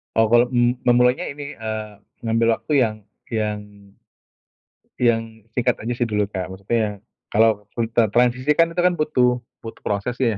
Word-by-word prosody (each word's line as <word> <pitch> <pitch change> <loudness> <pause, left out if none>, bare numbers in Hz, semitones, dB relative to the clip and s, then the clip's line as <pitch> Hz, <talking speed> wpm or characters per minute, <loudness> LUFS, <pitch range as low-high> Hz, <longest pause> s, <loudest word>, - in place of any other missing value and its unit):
Oh, 115 -1 +3
kalau 120 +1 +5
m 120 +1 +3
memulainya 125 +1 +4
ini, 145 0 -7
eee, 110 -1 -4 0.3
ngambil 115 0 +2
waktu 150 - -3
yang 110 -2 -1 0.3
yang 105 -2 -2 1.4
yang 115 -2 +3 0.3
singkat 125 - +1
aja 115 +3 -3
sih 120 - 0
dulu, 105 -3 0
Kak, 95 -2 -5
maksudnya, 105 +2 -2 0.3
kalau 110 -1 +3
full 115 -1 -1
tra 115 -2 +2
transisi 125 +4 +2
kan 165 +2 +3
tuh 175 - +1
kan 180 0 +4
butuh 125 -6 +1 0.2
butuh 115 - -9
prosesnya 120 +5 -1
115 Hz, 155 wpm, -22 LUFS, 110-125 Hz, 1.4 s, kalau